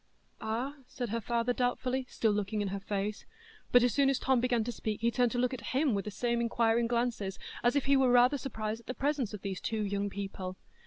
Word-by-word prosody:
"Ah?" 245 +7 -2
said 245 -3 -4
her 230 +2 -1
father, 235 +2 0
doubtfully, 250 +1 -1
still 220 - +1
looking 210 +1 -1
in 205 -1 -1
her 200 +1 -3
face. 200 +1 -3 0.4
But 245 -1 +7
as 245 - +3
soon 280 -1 +4
as 275 - +2
Tom 260 -2 +2
began 245 -2 +2
to 240 - -3
speak 215 -1 -4
he 235 +1 +2
turned 245 -1 +2
to - - -1
look 250 +1 +1
at 255 +1 -5
him 280 -3 +3
with 200 0 -1
the - - -3
same 235 +3 0
inquiring 230 0 +2
glances, 235 -5 -1 0.3
as 240 +2 +3
if 285 - +2
he 280 0 +4
were 265 -2 +4
rather 250 +3 +5
surprised 220 -4 -3
at - - -28
the 255 - -4
presence 280 -5 0
of 210 -3 -8
these 195 -2 -4
two 220 -2 -1
young 200 0 -1
people. 195 -2 -5
235 Hz, 235 wpm, -31 LUFS, 210-250 Hz, 0.4 s, But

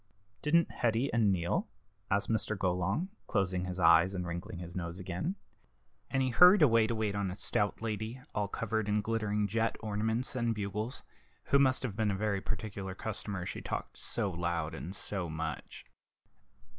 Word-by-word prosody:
"Didn't 165 +3 +3
Hetty 120 +3 0
and 110 -4 +4
Neal?" 85 -2 0 0.4
asked 100 +3 +2
Mr. 110 -1 0
Golong, 95 - 0 0.2
closing 95 -3 0
his 90 0 -4
eyes 85 +2 +6
and 90 -1 -2
wrinkling 85 +1 -5
his 85 0 -8
nose 85 0 -4
again; 95 - -3 0.7
and 135 0 +1
he 130 - +1
hurried 180 +6 +8
away 115 -5 +5
to 115 - -1
wait 110 -2 0
on 100 -1 -1
a 90 - -5
stout 105 +1 -1
lady, 110 +2 -3
all 105 -1 0
covered 110 0 -2
with 105 0 +1
glittering 110 -1 0
jet 115 +3 0
ornaments 110 +4 -1
and 120 -2 0
bugles, 105 +4 -3 0.4
who 140 - +3
must 130 -1 +4
have 115 -7 -3
been 110 -1 +1
a 100 - 0
very 100 -1 0
particular 100 -2 -4
customer, 100 -3 -3
she - - -5
talked - - -5
so 105 -5 -1
loud 85 -2 -2
and 90 +5 -6
so 95 -5 -4
much. 80 +1 -5
105 Hz, 170 wpm, -32 LUFS, 95-115 Hz, 0.7 s, hurried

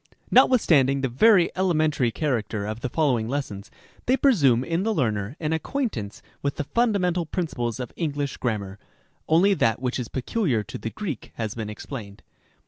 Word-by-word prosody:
| - - -35
Notwithstanding 140 - +4
the 135 - +1
very 180 - +4
elementary 155 -8 +2
character 110 -4 -2
of 110 +2 -4
the 125 - -3
follow 140 -4 +2
ing 110 +1 -4
lessons, 110 -8 -4 0.4
they 260 +2 +4
presume 140 - +4
in 165 +5 -1
the 220 +2 0
learner 110 - -1
an 155 -1 -1
acquaintance 160 - -3 0.2
with 140 -1 -1
iv - - -30
PREFACE, 145 - -2
the - - -36
fundamental 190 -7 +2
principles 120 - -3
of 125 -2 -6
English 145 -4 -2
grammar; 105 -5 -3 0.5
only 180 +6 +5
that 115 -12 +1
which 125 0 -2
is 120 - -3
peculiar 130 - -1
to - - -8
the 115 - -4
Greek 165 - -6
has 110 -2 -3
been 110 -2 -5
explained. 105 -2 -8
135 Hz, 180 wpm, -25 LUFS, 115-170 Hz, 0.5 s, only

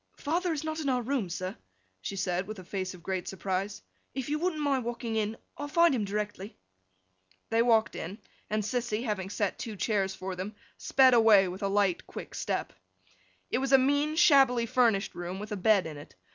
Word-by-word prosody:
'Father 345 +4 0
is 310 -2 -2
not 315 0 -3
in 290 -3 -1
our 250 -2 +1
room, 245 -6 -1
sir,' 185 +2 -4 0.5
she 195 - -4
said, 185 -1 -1
with 215 0 -6
a 185 - -9
face 185 0 -4
of 175 - -15
great 185 -1 -3
surprise. 195 +1 -3 0.3
'If 265 0 -3
you 300 +1 0
wouldn't 345 -2 -1
mind 275 -3 +1
walking 235 -1 -3
in, 215 +1 -1 0.2
I'll 290 - -3
find 335 +1 +4
him 225 -5 0
directly.' 205 0 -4 0.9
They 225 +1 +4
walked 230 -2 +3
in; 185 +6 -5 0.3
and 215 0 0
Sissy, 235 0 -1
having 205 -5 -2
set 205 -1 -2
two 220 -2 -5
chairs 195 -2 0
for 190 0 -5
them, 190 +4 -5 0.2
sped 260 -1 +4
away 220 -5 +6
with 185 +3 -7
a 200 - +1 0.4
quick - - -8
light - - -12
step. - - -2 0.8
It - - +1
was 270 +1 0
a - - +10
mean, 285 +3 +2
shabbily 270 -8 +5
furnished 230 -5 +2
room, 175 +2 -5
with 210 +2 -7
a - - -1
bed 200 -1 +3
in 155 -2 -6
it. 145 - -12
215 Hz, 200 wpm, -29 LUFS, 195-265 Hz, 0.9 s, a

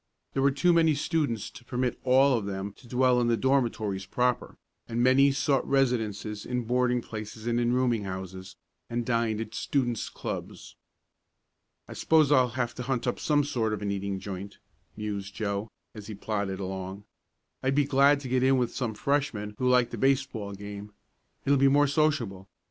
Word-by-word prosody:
There 135 - 0
were 140 - +5
too 160 +6 +3
many 160 -2 +4
students 140 - -1
to 120 - -13
permit 125 0 -2
all 130 +1 +5
of 105 -4 -2
them 100 0 -4
to 125 - -16
dwell 125 0 +3
in 120 - +1
the 115 -1 +2
dormitories 110 -8 0
proper, 125 0 -1 0.3
and 120 +1 0
many 135 +2 +5
sought 135 -1 +1
residences 110 -6 0
in 125 0 -2
boarding 125 0 +1
places 110 0 -8
and 120 0 +1
in 120 0 +1
rooming 120 -4 +1
houses, 95 0 -7 0.3
and 120 0 -2
dined 115 -3 0
at 110 0 -5
students' 120 -5 -1
clubs. - - -7 1.1
"I - - -8
suppose 155 -3 +3
I'll 130 -3 +5
have 120 -1 -1
to - - -7
hunt 125 0 -2
up 125 - -1
some 145 -1 +2
sort 115 -6 -1
of 105 - -4
an 100 - -1
eating 100 -1 -3
joint," 100 +1 -7 0.4
mused 100 -2 -5
Joe, 100 0 -2 0.2
as 105 -2 -10
he 110 - -6
plodded 100 -2 -3
along. 95 +1 -5 0.6
"I'd 135 +1 0
be 145 -1 +3
glad 140 +1 +4
to 135 - -6
get 130 0 +1
in 130 +1 +4
with 125 -2 0
some 120 -4 -2
freshmen 120 -6 -1
who 125 - +2
like 125 -1 +3
the - - -5
baseball 130 -7 0
game. 100 +1 -8 0.5
It'll 140 0 +3
be 140 - +5
more 145 +2 +5
sociable. 140 -10 0
120 Hz, 180 wpm, -28 LUFS, 105-135 Hz, 1.1 s, were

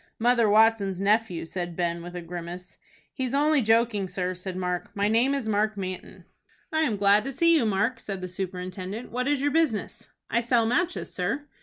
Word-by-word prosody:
"Mother 235 -1 +3
Watson's 210 -3 +3
nephew," 205 -3 +1
said 175 0 -5
Ben, 170 -1 -1
with 175 +1 -9
a 175 - -5
grimace. 175 +1 -8 0.3
"He's 260 -1 -2
only 295 0 +3
joking, 225 -3 +2
sir," 180 0 -2
said 185 0 -6
Mark. 180 -1 -2
"My 200 0 +1
name 240 +6 +3
is 270 -5 -3
Mark 215 0 +1
Manton." 185 -1 -6 0.5
"I 315 - +2
am 235 -10 +1
glad 200 +1 +4
to 270 - -3
see 335 +5 +4
you, 255 -8 +2
Mark," 215 +4 0
said 195 -4 -5
the 185 - -5
superintendent. 185 +3 -5
"What 250 +2 -2
is 285 -1 +1
your 290 - +2
business?" 280 - -1 0.2
"I 235 - +1
sell 235 -1 +2
matches, 340 +10 -1
sir." 220 +11 -2
210 Hz, 190 wpm, -26 LUFS, 185-245 Hz, 0.5 s, glad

